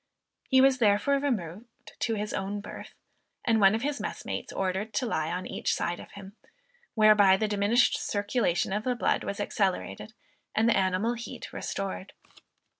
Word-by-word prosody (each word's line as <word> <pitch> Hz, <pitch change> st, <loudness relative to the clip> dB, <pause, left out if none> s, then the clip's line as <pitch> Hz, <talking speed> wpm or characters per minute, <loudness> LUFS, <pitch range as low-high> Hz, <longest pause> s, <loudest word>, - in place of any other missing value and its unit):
He 260 Hz, -1 st, +6 dB
was, 265 Hz, -1 st, +4 dB
therefore, 225 Hz, +6 st, +3 dB
removed 230 Hz, -, -4 dB
to 225 Hz, -, 0 dB
his 210 Hz, 0 st, -3 dB
own 195 Hz, +2 st, -3 dB
birth, 200 Hz, -, -10 dB, 0.5 s
and 225 Hz, -1 st, +3 dB
one 195 Hz, +1 st, +6 dB
of 225 Hz, -, -3 dB
his 285 Hz, 0 st, -2 dB
messmates -, -, -5 dB
ordered 195 Hz, +3 st, -2 dB
to 260 Hz, -, +1 dB
lie 160 Hz, -9 st, -1 dB
on 180 Hz, +2 st, -3 dB
each -, -, -1 dB
side 175 Hz, -, -2 dB
of -, -, -12 dB
him, 200 Hz, 0 st, -11 dB, 0.6 s
whereby 210 Hz, -3 st, +6 dB
the 215 Hz, -, 0 dB
diminished 210 Hz, +4 st, +2 dB
circulation 205 Hz, -3 st, 0 dB
of 210 Hz, +1 st, -1 dB
the 250 Hz, 0 st, 0 dB
blood -, -, 0 dB
was -, -, -4 dB
accelerated, -, -, -2 dB, 0.4 s
and 220 Hz, +1 st, +3 dB
the 230 Hz, -, +4 dB
animal 190 Hz, +4 st, +1 dB
heat 235 Hz, 0 st, -8 dB
restored. 195 Hz, -1 st, -5 dB
210 Hz, 165 wpm, -28 LUFS, 195-235 Hz, 0.6 s, He